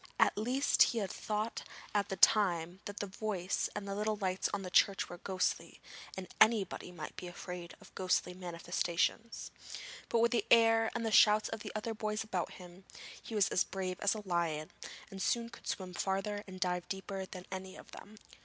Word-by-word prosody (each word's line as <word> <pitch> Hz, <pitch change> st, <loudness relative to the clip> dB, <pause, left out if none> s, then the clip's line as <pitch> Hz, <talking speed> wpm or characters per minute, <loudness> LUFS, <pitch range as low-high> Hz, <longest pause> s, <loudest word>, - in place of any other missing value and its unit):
At -, -, +4 dB
least 250 Hz, +6 st, +1 dB
he 235 Hz, -, +6 dB
had 200 Hz, -4 st, -1 dB
thought 215 Hz, +1 st, -2 dB, 0.3 s
at 205 Hz, -1 st, +1 dB
the 195 Hz, -, -2 dB
time 180 Hz, -3 st, +4 dB
that 205 Hz, 0 st, -6 dB
the -, -, -1 dB
voice 195 Hz, -2 st, -2 dB
and 205 Hz, -1 st, -4 dB
the 200 Hz, -, -2 dB
lights 205 Hz, -3 st, 0 dB
in 200 Hz, -1 st, -2 dB
the 180 Hz, -, -6 dB
church 195 Hz, +1 st, +4 dB
were 175 Hz, -, -8 dB
ghostly, 185 Hz, 0 st, -1 dB, 0.4 s
and 185 Hz, -1 st, -5 dB
anybody 215 Hz, -5 st, +4 dB
might 165 Hz, -4 st, -7 dB
be 180 Hz, -, -6 dB
afraid 175 Hz, 0 st, -7 dB
of -, -, -16 dB
ghostly 185 Hz, -1 st, +1 dB
manifestations. 175 Hz, +4 st, -2 dB, 0.6 s
But -, -, +2 dB
with 230 Hz, +1 st, +4 dB
the 240 Hz, -, +2 dB
air 225 Hz, -1 st, +6 dB
and 235 Hz, -1 st, -1 dB
the 225 Hz, -, 0 dB
shouts 210 Hz, 0 st, +6 dB
of 225 Hz, -, -5 dB
other 220 Hz, +1 st, -2 dB
boys 215 Hz, 0 st, -2 dB
about 190 Hz, -5 st, -2 dB
him, 180 Hz, +1 st, -12 dB, 0.4 s
he 225 Hz, -, -7 dB
was 205 Hz, -2 st, +4 dB
as 185 Hz, -, +3 dB
brave 185 Hz, -1 st, -4 dB
as 205 Hz, +1 st, +2 dB
a 210 Hz, -2 st, -7 dB
lion, 165 Hz, -3 st, 0 dB, 0.4 s
and 195 Hz, -1 st, -6 dB
soon 235 Hz, +3 st, +1 dB
could 230 Hz, -, -13 dB
swim 185 Hz, -2 st, -3 dB
farther 195 Hz, +3 st, -1 dB
and 185 Hz, -1 st, -9 dB
dive 180 Hz, -1 st, -1 dB
deeper 195 Hz, 0 st, -4 dB
than 185 Hz, -1 st, -9 dB
any 190 Hz, 0 st, -6 dB
of -, -, -13 dB
them. 210 Hz, +2 st, -11 dB
195 Hz, 190 wpm, -34 LUFS, 180-215 Hz, 0.6 s, he